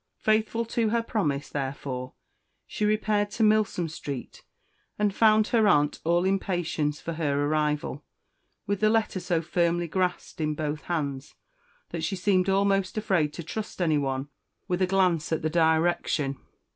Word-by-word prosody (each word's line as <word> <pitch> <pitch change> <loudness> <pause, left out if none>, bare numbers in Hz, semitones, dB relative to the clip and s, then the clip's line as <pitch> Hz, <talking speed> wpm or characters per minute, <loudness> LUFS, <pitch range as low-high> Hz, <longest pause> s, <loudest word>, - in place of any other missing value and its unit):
Faithful 220 +2 +1
to 230 -1 0
her 230 +1 +1
promise, 150 -12 -1
therefore, 130 -2 -4 0.5
she 210 - -2
repaired 210 -1 +1
to 220 +2 -1
Milsom 215 -5 +2
Street, 140 -5 -7 0.5
and 210 -1 +1
found 215 0 +4
her 225 -3 +3
aunt 150 -6 +3
all 170 +2 +2
impatience 175 -6 -1
for 165 - -5
her 145 -3 0
arrival, 150 0 -1 0.6
with 200 0 -1
the 215 - +4
letter 220 -3 +1
so 175 -2 -1
firmly 170 +1 +1
grasped 180 -1 -2
in 155 -1 0
both 150 -1 -3
hands, 145 -5 -3 0.6
that 165 -2 -4
she 165 +4 -1
seemed 185 0 +2
almost 195 0 +1
afraid 185 -8 +1
to 170 - -6
trust 210 +7 -6
anyone 145 -5 0 0.4
with 180 -1 -1
a 185 - +3
glance 180 -4 +1
at 160 - -1
the 155 - 0
direction. 160 -4 +1
175 Hz, 150 wpm, -27 LUFS, 150-205 Hz, 0.6 s, found